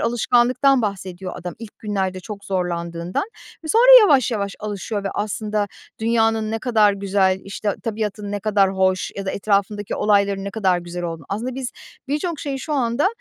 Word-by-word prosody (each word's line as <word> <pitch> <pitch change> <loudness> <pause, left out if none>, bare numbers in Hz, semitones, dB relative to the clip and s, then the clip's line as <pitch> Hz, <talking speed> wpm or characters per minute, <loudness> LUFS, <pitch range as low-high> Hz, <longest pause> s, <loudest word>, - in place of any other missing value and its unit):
alışkanlıktan 245 +3 +3
bahsediyor 190 -2 -4
adam 180 0 -6
ilk 225 -2 -11
günlerde 190 -3 -2
çok 200 +1 -8
zorlandığından 175 - -2 0.4
ve 315 - -6
sonra - - +9
yavaş 275 - +4
yavaş 200 -3 -2
alışıyor 205 0 -4
ve 195 - 0
aslında 210 0 -1 0.3
dünyanın 225 -1 +1
ne 225 - -1
kadar 215 -4 +3
güzel, 195 -1 +1
işte, 200 +1 -3
tabiatın 210 -2 -3
ne 205 - -2
kadar 200 -2 +3
hoş 185 -1 +1
ya 195 -1 -5
da - - 0
etrafındaki 200 0 0
olayların 200 -2 +2
ne 200 - -4
kadar 190 -4 +1
güzel 175 0 -6
olduğunu, 165 -3 -5
aslında 235 +6 -3
biz 260 -1 -4 0.4
birçok 300 +2 -2
şeyi 275 -2 -3
şu 305 - -5
anda 255 +3 +1
205 Hz, 170 wpm, -21 LUFS, 190-230 Hz, 0.4 s, sonra